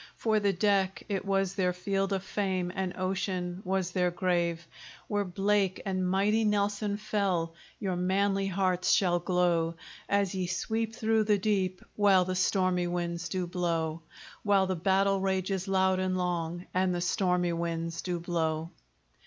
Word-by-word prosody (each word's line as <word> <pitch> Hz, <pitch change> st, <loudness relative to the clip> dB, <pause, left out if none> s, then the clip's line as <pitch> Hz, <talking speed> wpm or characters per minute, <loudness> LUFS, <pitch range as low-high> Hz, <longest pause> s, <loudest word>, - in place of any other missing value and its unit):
For 220 Hz, -2 st, +1 dB
the 200 Hz, -1 st, +2 dB
deck 195 Hz, 0 st, +1 dB
it 200 Hz, -1 st, -2 dB
was 195 Hz, -1 st, +1 dB
their 185 Hz, -2 st, +1 dB
field 195 Hz, +2 st, -1 dB
of 190 Hz, -1 st, -1 dB
fame, 190 Hz, -3 st, -1 dB
And 185 Hz, -1 st, -3 dB
Ocean 185 Hz, -1 st, -2 dB
was 190 Hz, -1 st, -1 dB
their 180 Hz, -1 st, +2 dB
grave: 175 Hz, -2 st, 0 dB, 0.4 s
Where 205 Hz, -1 st, 0 dB
Blake 195 Hz, 0 st, +1 dB
and 185 Hz, -2 st, 0 dB
mighty 205 Hz, +4 st, +2 dB
Nelson 205 Hz, 0 st, 0 dB
fell, 190 Hz, -6 st, -1 dB, 0.3 s
Your 190 Hz, -3 st, -1 dB
manly 195 Hz, +2 st, +1 dB
hearts 185 Hz, -1 st, +1 dB
shall 175 Hz, -3 st, +3 dB
glow, 170 Hz, -2 st, +1 dB, 0.3 s
As 200 Hz, -2 st, +1 dB
ye 185 Hz, -2 st, -2 dB
sweep 220 Hz, +5 st, -2 dB
through 220 Hz, -2 st, +2 dB
the 210 Hz, -1 st, +3 dB
deep, 190 Hz, -2 st, 0 dB
While 195 Hz, -3 st, +4 dB
the 185 Hz, -, -2 dB
stormy 185 Hz, -1 st, +1 dB
winds 175 Hz, 0 st, -3 dB
do 185 Hz, +1 st, -1 dB
blow; 165 Hz, -2 st, -1 dB, 0.4 s
While 200 Hz, -2 st, +3 dB
the 185 Hz, 0 st, -1 dB
battle 195 Hz, +2 st, +2 dB
rages 190 Hz, 0 st, -1 dB
loud 190 Hz, -1 st, +2 dB
and 185 Hz, 0 st, 0 dB
long, 175 Hz, -1 st, -2 dB
And 185 Hz, -1 st, +1 dB
the -, -, -1 dB
stormy 180 Hz, -1 st, +1 dB
winds 165 Hz, 0 st, -3 dB
do 175 Hz, -2 st, -2 dB
blow. 165 Hz, -1 st, -1 dB
185 Hz, 155 wpm, -29 LUFS, 175-195 Hz, 0.4 s, While